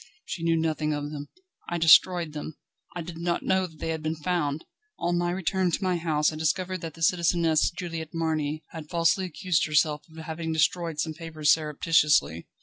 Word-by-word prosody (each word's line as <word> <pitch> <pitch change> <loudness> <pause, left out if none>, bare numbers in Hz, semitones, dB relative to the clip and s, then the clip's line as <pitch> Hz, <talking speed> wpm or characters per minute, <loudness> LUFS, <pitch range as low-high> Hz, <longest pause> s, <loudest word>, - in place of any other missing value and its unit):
"She 170 - -5
knew 165 0 +2
nothing 155 -1 0
of 145 0 -4
them. 145 -1 -6 0.4
I 175 - -1
destroyed 165 0 +5
them; 150 0 -7 0.4
I 175 - -4
did 165 0 -8
not 170 0 -1
know 190 0 +1
that 160 -2 -17
they 165 - -4
had 160 -1 -2
been 155 +1 -2
found; 155 -2 -2 0.3
on 175 0 0
my 175 0 0
return 185 +1 0
to 175 - -2
my 185 -1 +1
house 155 -2 +1
I - - -6
discovered 185 +3 -1
that 165 -2 -6
the 165 - -6
Citizeness 170 -2 +3
Juliette 165 -3 -6
Marny 155 -2 -1
had 160 -2 -9
falsely 170 +3 +2
accused 175 -1 0
herself 150 0 +2
of 160 - -16
having 160 0 -4
destroyed 160 0 0
some 160 0 -1
papers 155 -2 0
surreptitiously." 150 - +2
160 Hz, 190 wpm, -26 LUFS, 155-175 Hz, 0.4 s, destroyed